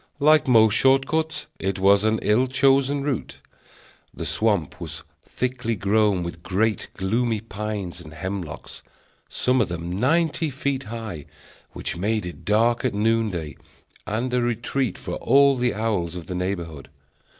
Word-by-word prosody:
Like 155 +1 +5
most 110 -4 +6
short 135 +2 +4
cuts, 160 +1 -1
it 95 0 -2
was 100 +1 +4
an 110 +1 +2
ill 115 +5 +3
chosen 135 +1 +2
route. 140 -5 -3 0.7
The - - -6
swamp 105 -8 0
was - - -6 0.2
thickly 125 -2 -2
grown 100 -1 +2
with 85 -1 -6
great, 105 +5 0
gloomy 110 +4 0
pines 105 -4 -5
and 80 -2 -11
hemlocks, 90 -1 -6 0.5
some 130 0 +1
of - - 0
them 85 +2 -4
ninety 160 +4 +2
feet 140 0 -2
high, 110 -9 -6 0.5
which - - -4
made 105 +2 -1
it 90 - -9
dark 115 +3 +2
at 125 -5 0
noonday 105 -7 0 0.5
and 120 +4 -2
a 125 - +2
retreat 120 0 -1
for - - -5
all 140 +2 +5
the 125 -2 0
owls 100 -6 -1
of 85 -2 -7
the 90 - -5
neighborhood. 85 -6 -4
110 Hz, 150 wpm, -24 LUFS, 95-130 Hz, 0.7 s, most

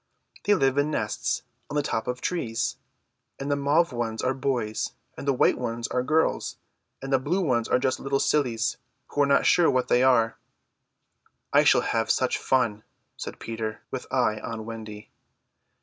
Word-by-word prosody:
They 205 - +5
live 135 -3 +2
in 145 +1 +2
nests 105 -8 -1 0.3
on 145 - -5
the 145 - +2
tops 110 -5 -2
of 125 0 -3
trees; 120 -11 -1 0.6
and 140 +1 -3
the - - +3
mauve 145 +3 +2
ones 115 -2 -2
are 130 - +2
boys 130 -5 -2 0.2
and 140 - -8
the 140 - +4
white 125 - +3
ones 115 -1 -3
are 125 - 0
girls, 155 +5 0 0.5
and 135 0 -3
the 135 - +5
blue 160 +9 0
ones 120 -9 +1
are - - +3
just 130 +1 0
little 135 0 0
sillies 125 -8 +1 0.3
who 145 - 0
are 140 - +4
not 140 0 +3
sure 175 -2 +5
what 130 -2 +1
they 125 - +4
are." 120 -3 +3 1.2
"I - - +6
shall - - +5
have - - -1
such - - +1
fun," 115 -5 +1 0.3
said - - -7
Peter, 110 -1 -5
with - - -6
eye 110 0 +1
on 110 0 -6
Wendy. 110 -2 -8
130 Hz, 180 wpm, -26 LUFS, 115-140 Hz, 1.2 s, I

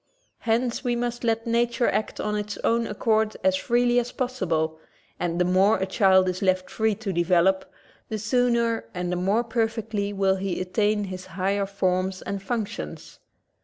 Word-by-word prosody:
Hence 235 +2 0
we 245 -2 0
must 240 0 -3
let 225 -1 0
nature 235 +1 +1
act! 215 - -1
of 210 - -1
its 210 0 -3
own 230 0 +2
accord 215 0 +1
as 285 0 +4
freely 245 -3 +2
as 245 0 -3
possible 165 -11 -1 0.4
and 170 0 -1
the 180 - +3
more 190 +4 +4
a 190 - -1
child 190 -2 +4
is 185 0 -2
left 185 -1 +1
free 220 -1 +1
to 200 -2 -4
develop, 180 +2 +2 0.4
the 220 - -2
sooner 235 - +1
and 180 0 -2
the - - 0
more 195 +6 +1
perfectly 225 -3 -1
will 195 -1 +1
he 190 -1 -2
attain 205 +3 +1
his 185 -1 -7
higher 195 +2 -1
forms 185 -1 -1
and 200 -1 -4
functions. 215 +1 -5
210 Hz, 165 wpm, -25 LUFS, 185-230 Hz, 0.4 s, as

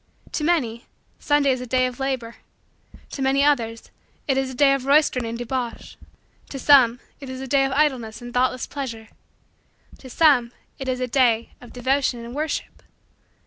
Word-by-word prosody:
To 300 - -3
many, 260 -8 0 0.3
Sunday 290 -2 +2
is 255 -1 -2
a 250 - -7
day 255 +1 +2
of 250 0 -5
labor. 260 -4 -3 0.7
To 275 - -6
many 270 +1 +2
others, 230 -6 0 0.4
it 270 - +2
is 265 0 0
a 260 - -8
day 275 +1 +5
of 270 -1 -3
roistering 280 -4 +3
and 230 +1 -4
debauch. 245 0 -5 0.5
To 275 - -6
some, 255 -4 +5 0.2
it 275 -2 -9
is 260 0 -6
a 265 - -5
day 270 +1 +3
of 270 - -2
idleness 255 -7 0
and 240 0 -9
thoughtless 255 0 +1
pleasure. 230 -6 -7 0.9
To 260 - -12
some, 250 -5 +3 0.3
it 270 - -5
is 255 -1 -1
a 255 - -1
day 235 -3 +2
of 245 - -13
devotion 255 -1 -1
and 235 - -9
worship. 305 +2 -4
260 Hz, 180 wpm, -23 LUFS, 240-275 Hz, 0.9 s, day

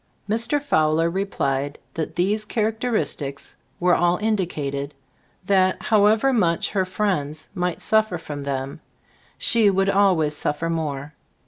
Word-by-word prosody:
Mr. 230 +7 +1
Fowler 165 - +2
replied 145 -7 -2 0.2
that 160 -2 -4
these 200 +5 +1
char 215 0 0
acteristics 190 - -3 0.3
were 180 0 +3
all 175 +1 +3
indicated; 150 -10 -2 0.5
that, 185 -1 +3
however 220 +5 +3
much 175 -8 +1
her 190 -2 +1
friends 160 -6 -2
might 180 -3 -2
suf 220 0 +3
fer 175 - -3
from 145 -3 -7
them, 135 -1 -4 0.6
she 225 -3 +3
would 195 0 +2
always 180 -7 +3
suf 145 0 -1
fer 165 +2 -2
more. 150 -3 -3
180 Hz, 135 wpm, -23 LUFS, 150-210 Hz, 0.6 s, were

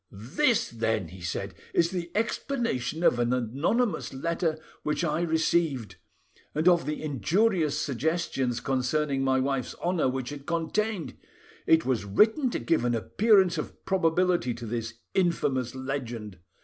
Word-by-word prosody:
"This, 205 - +1
then," 110 -5 -1
he 90 +2 -12
said, 85 - -4 0.2
"is 170 +1 +3
the 175 -2 -3
explanation 220 - -1
of 120 - +4
an 120 0 +1
anonymous 140 - 0
letter 165 +2 -1 0.2
which 150 +3 -1
I 155 0 0
received, 160 - 0 0.6
and 155 +3 +1
of 175 -5 +4
the 150 +1 -3
injurious 155 - +1
suggestions' 135 -3 -1
concerning 135 +2 0
my 130 0 +2
wife's 135 -2 -1
honour 175 -6 0
which 130 0 -3
it 145 -1 -9
contained; 175 +3 -1 0.5
it 160 0 +5
was 125 -5 0
written 220 - +3
to - - -2
give 165 -7 +1
an 120 -1 +1
appearance 190 - +3
of - - -7
probability 175 -7 +2
to 120 0 -7
this 115 0 -4 0.2
infamous 135 -9 0
legend. 120 -7 -5
150 Hz, 140 wpm, -27 LUFS, 125-175 Hz, 0.6 s, it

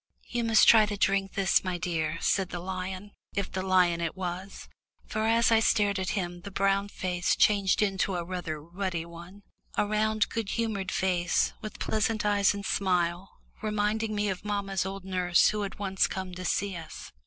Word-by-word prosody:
"You 240 -1 -2
must 225 -2 +5
try 220 -2 +7
to 205 -1 -4
drink 195 -1 +1
this, 195 -1 +3
my 185 -1 -2
dear," 165 -3 -2
said 190 -2 +1
the 180 - -5
lion, 185 +2 -5 0.2
if 200 -1 -2
the 185 - -2
lion 180 -3 +3
it 165 -1 -2
was, 185 +1 -6 0.4
for 215 0 -1
as 230 +1 +3
I 225 - +6
stared 205 -3 +2
at 190 +3 -2
him 175 -2 -3
the 200 - -8
brown 195 +1 +1
face 180 -2 -1
changed 200 -1 +3
into 195 -1 0
a 175 - -2
rather 175 -4 -4
ruddy 170 +1 -4
one 170 +4 -12 0.3
a - - +3
round 215 0 +1
good 225 -3 -3
humoured 215 -5 -2
face, 180 -2 +1
with 215 -1 -7
pleasant 220 0 -1
eyes 205 -1 +3
and 200 0 -6
smile, 180 -1 0 0.2
reminding 215 +1 -1
me 205 0 0
of 190 -2 -3
mamma's 200 -2 -2
old 195 -1 -7
nurse 180 -2 +3
who 210 0 -2
had 200 - -5
once 195 -2 +1
come 190 -1 -5
to 185 +1 -7
see 195 +2 0
us. 165 -2 -9
195 Hz, 190 wpm, -28 LUFS, 180-205 Hz, 0.4 s, try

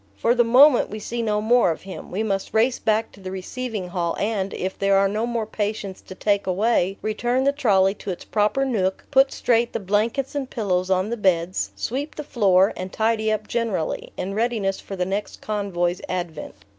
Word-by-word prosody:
For 235 - +3
the 245 -1 +4
moment 255 +4 +6
we 215 - -6
see 235 +3 -4
no 210 -2 0
more 235 -2 +4
of 165 - -3
him; 190 -1 -8
we 205 +4 -2
must 195 -2 -2
race 240 +3 +3
back 220 +1 0
to - - -17
the 190 -1 -7
receiving 195 +1 -5
hall, 175 -2 -2
and, 200 -2 -1
if 190 +1 -3
there 195 0 +3
are 195 0 +4
no 215 +4 -1
more 235 -2 -1
patients 210 -2 -4
to 185 - -11
take 200 0 0
away, 195 0 +1
return 240 +4 0
the 280 - +4
trolley 195 -9 +3
to 205 - -9
its 180 - -5
proper 215 +6 +1
nook, 190 -7 -1
put 270 -1 +5
straight 235 0 +1
the - - -1
blankets 215 +7 0
and 275 -3 -3
pillows 185 -5 -1
on 190 +3 +1
the 235 - -2
beds, 185 -3 +1
sweep 280 +5 -3
the 300 - -5
floor, 195 -8 +3
and 185 0 -6
tidy 220 0 +1
up 215 0 -2
generally, 225 -9 -2
in 195 +2 -3
readiness 215 -3 0
for 195 - -7
the 180 -1 -1
next 195 +3 -3
convoy's 185 -4 -1
advent. 175 -4 -4
210 Hz, 205 wpm, -23 LUFS, 190-235 Hz, -, moment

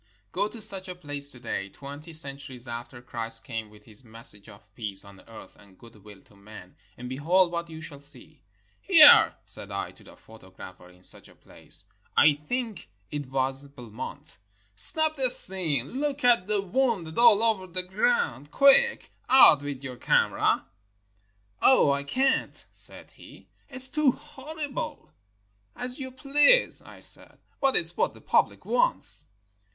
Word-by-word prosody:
Go - - -1
to 220 0 -8
such 195 -3 -2
a 180 - -7
place 145 -4 -1
to 125 - -10
day, 100 -5 -5
twenty 145 - -12
centuries 140 -5 -4
after 120 +1 -9
Christ 115 -2 0
came 115 -4 -7
with 105 0 -20
his 110 +2 -16
message 110 -3 -5
of 100 0 -19
peace 105 -3 -3
on 100 -1 -16
earth 115 -1 -14
and 100 -2 -22
good 115 -4 -18
will 105 -2 -16
to 105 - -25
men, 100 -2 -15 0.2
and 125 - -9
behold 170 +8 0
what 170 0 -5
you 160 -1 -10
shall 145 -2 -10
see. 145 +1 -1 0.4
"Here," 325 -6 +6
said - - 0
I - - -6
to - - -19
a - - -18
photographer 95 -4 -15
in 90 0 -23
such - - -3
a - - -20
place - - -8 0.2
— - - -30
I 150 - +4
think 220 - -6 0.2
it 145 -2 -6
was 135 +1 -4
Belmont 120 -5 -10 0.2
— - - -39
"snap 315 -1 +8
this 255 -2 +5
scene. 160 -9 +2
Look 285 +1 -2
at 235 -7 +2
the 210 -2 -2
wounded 200 -5 -2
all 230 -3 +5
over 215 -5 -1
the 185 +1 -3
ground. 470 - -2
Quick! 280 - +3 0.2
out 255 - +6
with 140 -2 -7
your 130 -2 -8
camera." - - 0 1.0
"Oh, 260 - +4
I 140 0 -2
can't," 265 - -2
said - - +1
he; - - -17 0.2
"it's 260 -1 +6
too 295 -2 +2
horrible!" 295 0 -8 0.6
"As 250 +1 -2
you 260 -1 -6
please," 290 - +2
I - - -16
said. - - +1 0.2
"But 270 -1 +1
it's 170 +1 0
what - - -2
the - - -16
public - - -1
wants." - - +2
160 Hz, 165 wpm, -25 LUFS, -, 1.0 s, snap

